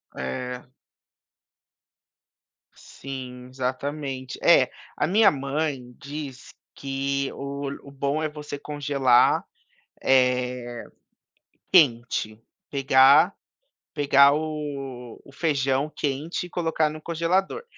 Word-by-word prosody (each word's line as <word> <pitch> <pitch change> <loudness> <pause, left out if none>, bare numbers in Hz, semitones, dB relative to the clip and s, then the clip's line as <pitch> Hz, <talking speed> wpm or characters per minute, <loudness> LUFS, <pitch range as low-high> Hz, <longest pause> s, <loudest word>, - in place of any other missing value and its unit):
É. 125 - -5 2.1
Sim, 125 -2 -9
exatamente. 130 0 -4
É, - - +5 0.3
a - - 0
minha 200 +3 +5
mãe 140 -3 -3
diz 140 -2 -8 0.2
que 140 0 -2
o 140 0 -5 0.2
o - - -13
bom 140 +2 -1
é 155 - 0
você 150 -1 -7
congelar, 140 -4 +2 0.6
eh, 125 -2 +1 0.9
quente, 120 - +2 0.3
pegar 140 +5 +5 0.6
pegar 140 -2 +5
o 140 -6 -5
o - - -16
feijão 140 -1 0
quente 150 +5 -3
e - - -19
colocar 160 -3 0
no 155 +1 -8
congelador. 175 - -1
140 Hz, 90 wpm, -25 LUFS, 130-150 Hz, 2.1 s, É